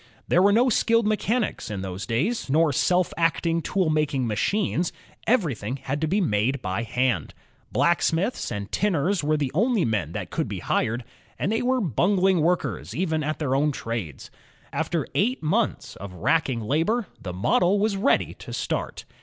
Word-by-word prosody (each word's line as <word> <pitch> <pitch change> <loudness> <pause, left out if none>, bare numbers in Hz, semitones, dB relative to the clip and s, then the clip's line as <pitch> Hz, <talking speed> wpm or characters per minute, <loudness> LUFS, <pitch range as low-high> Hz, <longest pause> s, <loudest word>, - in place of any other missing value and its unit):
There 180 - +4
were 200 +2 +5
no 235 +5 +4
skilled 230 -1 +3
mechanics 215 - 0
in 100 -3 -4
those 95 0 -5
days, 145 - -1
nor 155 +1 +3
self 180 +6 +2
acting 165 0 +1
tool 185 -1 0
making 150 -4 +1
machines; 175 - 0 0.4
everything 140 - +1
had 140 +2 -4
to 160 - +1
be 195 +7 +1
made 125 - +1
by 95 -1 -2
hand. 115 - -1 0.4
Blacksmiths 170 +5 +1
and 100 0 -5
tinners 185 -2 +1
were 155 +1 +2
the 140 -3 -1
only 220 - +2
men 95 -8 -1
that - - -5
could - - -1
be - - -4
hired, 115 +2 -1 0.3
and 195 - -1
they 225 - +1
JAMES 245 - -1
WATT 260 - +3
I) 245 - 0
were - - 0
bungling 185 - +2
workers 175 +3 -1
even 160 -3 0
at 155 +1 -2
their 140 -4 -1
own 150 +2 +2
trades. 115 - -5 0.4
After - - -1
eight 245 +4 0
months 155 - 0
of 95 -1 -8
racking 130 - +1
labor, 165 - 0 0.2
the 90 - -5
model 175 - +2
was 205 0 +1
ready 195 - +2
to - - -9
start. - - -3
160 Hz, 180 wpm, -25 LUFS, 120-195 Hz, 0.4 s, were